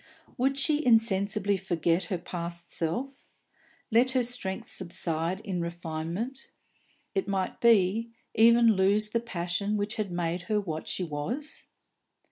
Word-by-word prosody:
Would 270 +1 +1
she 300 +2 +2
insensibly 205 -4 +2
forget 175 -1 0
her 190 - -2
past 170 0 -6
self, 255 - -3 0.7
let 245 +3 +4
her 255 -2 +3
strength 235 -6 -2
subside 170 0 -1
in 190 -5 -3
refinement 170 +9 -4 0.6
it 195 0 -1
might 195 -2 -2
be, 225 0 +4 0.2
even 230 0 +6
lose 200 +3 +3
the 230 - +1
passion 200 -1 -2
which 205 +2 -2
had 210 -4 -2
made 175 0 -1
her 210 -1 +2
what 160 -6 -5
she 185 - -2
was? 180 - -5
195 Hz, 130 wpm, -28 LUFS, 175-230 Hz, 0.7 s, even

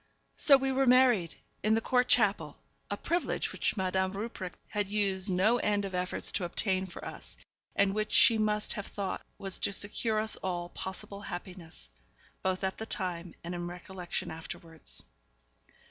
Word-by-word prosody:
So 280 -2 +7
we 270 0 0
were 265 0 +2
married, 245 -9 +5 0.3
in 215 +1 +3
the - - +3
Court 250 +2 +2
chapel, 195 -10 +3 0.3
a 205 - -2
privilege 345 +9 -1
which - - -1
Madame 190 0 0
Rupprecht 200 -3 -5
had 205 -1 -1
used 200 -1 +1
no 195 +6 +3
end 205 -2 +1
of 195 - -5
efforts 180 0 -1
to 195 - 0
obtain 190 +2 0
for 175 - -9
us, - - -8 0.4
and 200 -1 +3
which 215 +1 -1
she 225 -1 +6
must 210 0 +1
have 205 -3 -5
thought 195 -2 -3 0.2
was 195 -1 -2
to - - +1
secure 215 +2 +1
us 220 0 +1
all 175 -2 -3
possible 190 +2 -6
happiness, 175 - -8 0.5
both 185 0 -1
at 190 0 -1
the 220 - -5
time 175 -3 -4
and 170 +1 -4
in 175 0 -3
recollection 180 0 -5
afterwards. 160 - -3
195 Hz, 165 wpm, -31 LUFS, 180-215 Hz, 0.5 s, So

